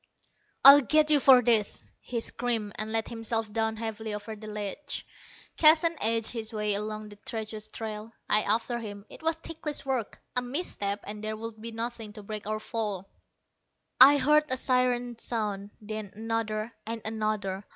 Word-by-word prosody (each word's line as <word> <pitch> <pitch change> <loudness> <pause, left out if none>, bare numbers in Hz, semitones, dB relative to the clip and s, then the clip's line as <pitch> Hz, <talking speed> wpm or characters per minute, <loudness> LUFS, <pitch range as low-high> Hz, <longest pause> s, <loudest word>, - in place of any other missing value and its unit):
"I'll 280 +1 +12
get 305 +3 +3
you 295 - +7
for 260 -2 +7
this!" 220 -3 +2
he 235 -2 -4
screamed, 230 -3 -2
and 215 0 -3
let 225 0 0
himself 225 -2 -2
down 220 0 0
heavily 220 -1 -4
over 210 +1 -7
the 215 0 -10
ledge. 210 +7 -5 0.5
Keston 325 +1 +5
edged 225 0 +1
his 225 -2 -4
way 210 -1 0
along 215 +1 -3
the 205 - -13
treacherous 215 0 -5
trail, 215 0 -6 0.2
I 210 - +4
after 230 +3 0
him. 205 -3 -8
It - - -11
was 325 0 +1
ticklish 320 -3 -5
work. 260 -5 -2 0.2
A 250 - +2
misstep, 245 - -3
and 210 +1 -7
there 215 0 -3
would 220 0 -7
be 230 +1 -6
nothing 225 -1 -5
to 210 -1 -10
break 210 0 -6
our 215 0 -1
fall. 210 -4 -4 0.9
I 280 +3 +10
heard 300 +3 +4
a 260 - 0
siren 245 -2 +1
sound, 205 -4 -3
then 215 -2 -6
another; 225 0 -2
and 230 -1 -4
another. 215 -3 -2
220 Hz, 170 wpm, -28 LUFS, 215-245 Hz, 0.9 s, I'll